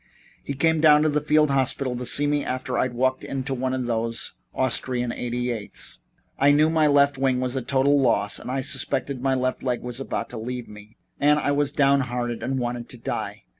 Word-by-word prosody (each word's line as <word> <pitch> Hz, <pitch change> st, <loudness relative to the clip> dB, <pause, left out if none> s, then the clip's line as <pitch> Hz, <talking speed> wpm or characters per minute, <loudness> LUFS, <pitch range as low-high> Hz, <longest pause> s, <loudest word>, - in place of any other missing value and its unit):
He 140 Hz, -, -4 dB
came 160 Hz, +2 st, +2 dB
down 150 Hz, -1 st, +6 dB
to 155 Hz, -, +3 dB
the 150 Hz, 0 st, 0 dB
field 150 Hz, 0 st, +3 dB
hospital 130 Hz, -1 st, 0 dB
to 125 Hz, 0 st, -4 dB
see 145 Hz, -, +3 dB
me 145 Hz, 0 st, +1 dB
after 130 Hz, 0 st, -3 dB
I'd 125 Hz, -1 st, 0 dB
walked 130 Hz, +1 st, 0 dB
into 135 Hz, 0 st, -3 dB
one 130 Hz, 0 st, -2 dB
of 130 Hz, -1 st, -2 dB
those 115 Hz, -1 st, -2 dB, 0.2 s
Austrian 125 Hz, -2 st, 0 dB
88's. 120 Hz, -3 st, -4 dB, 0.4 s
I 140 Hz, -, +5 dB
knew 150 Hz, +2 st, +4 dB
my 160 Hz, -2 st, +3 dB
left 140 Hz, -1 st, +3 dB
wing 130 Hz, -2 st, +1 dB
was 130 Hz, 0 st, -2 dB
a 130 Hz, -, -1 dB
total 135 Hz, +3 st, +2 dB
loss 105 Hz, -5 st, +2 dB
and -, -, -8 dB
I 135 Hz, +1 st, -1 dB
suspected 130 Hz, 0 st, -2 dB
my 135 Hz, 0 st, +1 dB
left 130 Hz, 0 st, -1 dB
leg 125 Hz, -2 st, -2 dB
was 125 Hz, 0 st, -5 dB
about 135 Hz, -, -4 dB
to 120 Hz, -, -6 dB
leave 125 Hz, +1 st, -5 dB
me, 105 Hz, +1 st, -14 dB, 0.2 s
and 150 Hz, +1 st, +4 dB
I 145 Hz, -1 st, 0 dB
was 145 Hz, 0 st, +1 dB
downhearted 125 Hz, -5 st, +1 dB
and 130 Hz, +3 st, -2 dB
wanted 120 Hz, -1 st, -3 dB
to 125 Hz, -, -8 dB
die. 115 Hz, -, -5 dB
130 Hz, 205 wpm, -24 LUFS, 125-140 Hz, 0.4 s, down